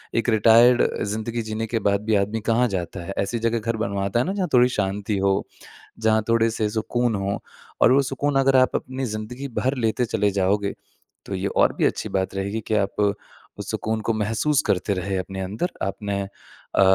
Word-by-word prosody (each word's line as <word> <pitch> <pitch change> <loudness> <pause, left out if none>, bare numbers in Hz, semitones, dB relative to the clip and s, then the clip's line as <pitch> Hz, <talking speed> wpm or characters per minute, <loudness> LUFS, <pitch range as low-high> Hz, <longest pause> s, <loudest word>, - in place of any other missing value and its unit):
एक 115 +1 +1
रिटायर्ड 115 +2 +6
अ, - - 0
ज़िंदगी 110 +3 -3
जीने 110 +1 -3
के 115 +1 -1
बाद 100 0 +2
भी 110 -1 +2
आदमी 105 +3 0
कहाँ 120 +2 +3
जाता 90 -1 -4
है? 100 - -5
ऐसी 110 +4 -1
जगह 115 +1 0
घर 115 +1 -2
बनवाता 100 0 -1
है - - -1
ना 190 - -1
जहाँ 195 -3 -1
थोड़ी 125 0 +6
शांति 100 -2 -1
हो, 95 0 +2 0.6
जहाँ 110 -1 +2
थोड़े 115 0 +3
से 110 -1 -1
सुकून 115 +2 0
हों 100 0 -1 0.4
और - - +6
वो 140 - +5
सुकून 135 +2 -1
अगर 135 0 +3
आप 130 -1 +3
अपनी 130 +1 -3
ज़िंदगी 115 +5 -5
भर 130 +2 0
लेते 120 +1 +1
चले 105 -3 +1
जाओगे, 100 +1 +1 0.5
तो - - -4
ये - - -2
और - - +2
भी - - +1
अच्छी - - -1
बात 95 0 -1
रहेगी 100 +3 -2
कि 110 - +1
आप 100 0 0 0.6
उस - - -6
सुकून 110 0 -2
को 115 - 0
महसूस 110 +7 +1
करते 100 +2 +1
रहें 95 +1 -2
अपने 95 +1 -5
अंदर, 105 - -2
आपने 100 +1 -2 0.5
अ, - - +4
110 Hz, 200 wpm, -23 LUFS, 100-120 Hz, 0.6 s, रिटायर्ड